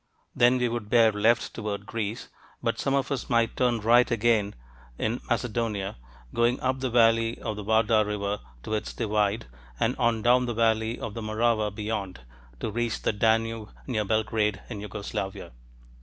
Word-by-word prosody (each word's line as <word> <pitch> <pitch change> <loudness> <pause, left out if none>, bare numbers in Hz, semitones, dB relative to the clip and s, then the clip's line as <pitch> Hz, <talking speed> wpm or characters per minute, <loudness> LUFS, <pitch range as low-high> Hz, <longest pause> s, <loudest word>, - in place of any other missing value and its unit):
Then 120 +1 +5
we 125 -1 +1
would 115 -3 -4
bear 115 -2 +5
left 110 +3 +2
toward 105 -2 -4
Greece, 110 +1 -4 0.3
but - - 0
some 135 - +1
of 140 +1 0
us 135 -4 -3
might 115 -1 +2
turn 120 -2 +2
right 120 +3 +5
again 115 -3 +1 0.4
in 115 +3 -1
Macedonia, 110 -4 -1 0.4
going 120 +2 +2
up 130 0 0
the 130 -1 -1
valley 115 -1 +3
of 110 - -4
the 105 - -6
Vardar 110 +1 +3
River 105 -1 -2 0.2
to 110 - -4
its 105 - -2
divide 105 -1 0 0.3
and 125 +3 +1
on 115 -2 +1
down 125 +1 +4
the 120 - -2
valley 110 0 +1
of 105 - -5
the 115 - -5
Morava 110 0 +1
beyond, 105 - -4 0.4
to 110 - -2
reach 120 +1 -2
the - - +1
Danube 115 0 +1 0.2
near 110 -5 -1
Belgrade 110 -1 0
in 105 -3 -5
Jugoslavia. 100 -2 -5
110 Hz, 170 wpm, -27 LUFS, 105-120 Hz, 0.4 s, Then